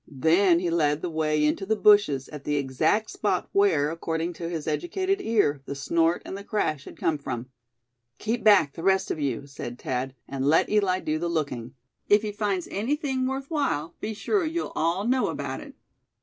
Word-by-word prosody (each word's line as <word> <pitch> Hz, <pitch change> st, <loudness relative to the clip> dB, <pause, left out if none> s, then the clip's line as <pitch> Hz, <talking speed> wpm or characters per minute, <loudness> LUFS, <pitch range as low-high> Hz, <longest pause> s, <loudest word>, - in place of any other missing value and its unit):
Then 165 Hz, +6 st, +4 dB
he 175 Hz, -1 st, -1 dB
led 150 Hz, -2 st, +1 dB
the 175 Hz, -, -2 dB
way 155 Hz, -1 st, +1 dB
into 150 Hz, +5 st, 0 dB
the 220 Hz, +3 st, +1 dB
bushes 205 Hz, -12 st, +4 dB
at 150 Hz, -2 st, -9 dB
the 150 Hz, -, -1 dB
exact 145 Hz, +10 st, +1 dB
spot 195 Hz, -4 st, -1 dB
where, 165 Hz, -7 st, +3 dB
according 165 Hz, +1 st, -3 dB
to 170 Hz, 0 st, -5 dB
his 165 Hz, -3 st, -4 dB
educated 375 Hz, -, -1 dB
ear, 205 Hz, -, +1 dB
the 140 Hz, -, -4 dB
snort 165 Hz, +5 st, +1 dB
and -, -, -6 dB
the 200 Hz, -, -7 dB
crash 155 Hz, -10 st, -1 dB
had -, -, -11 dB
come 155 Hz, -2 st, 0 dB
from. 125 Hz, -2 st, -5 dB, 0.7 s
"Keep 225 Hz, +2 st, -2 dB
back, 200 Hz, -10 st, +5 dB
the -, -, -8 dB
rest 190 Hz, +1 st, +2 dB
of -, -, -3 dB
you," 140 Hz, -2 st, -2 dB
said 130 Hz, -3 st, -7 dB
Thad, 130 Hz, +1 st, -3 dB
"and 135 Hz, -1 st, -4 dB
let 155 Hz, +3 st, +4 dB
Eli 195 Hz, -3 st, +2 dB
do 155 Hz, 0 st, -1 dB
the 170 Hz, +1 st, -2 dB
looking. 135 Hz, -7 st, -3 dB, 0.3 s
If 205 Hz, +1 st, +5 dB
he 210 Hz, -, -2 dB
finds 205 Hz, -4 st, -2 dB
anything 265 Hz, -, -1 dB
worth 270 Hz, +3 st, -4 dB
while, 165 Hz, -, -1 dB
be 220 Hz, 0 st, -4 dB
sure 360 Hz, -, 0 dB
you'll 330 Hz, +1 st, -3 dB
all 170 Hz, +5 st, 0 dB
know 255 Hz, +2 st, +2 dB
about -, -, -4 dB
it." -, -, -12 dB
170 Hz, 195 wpm, -26 LUFS, 150-210 Hz, 0.7 s, back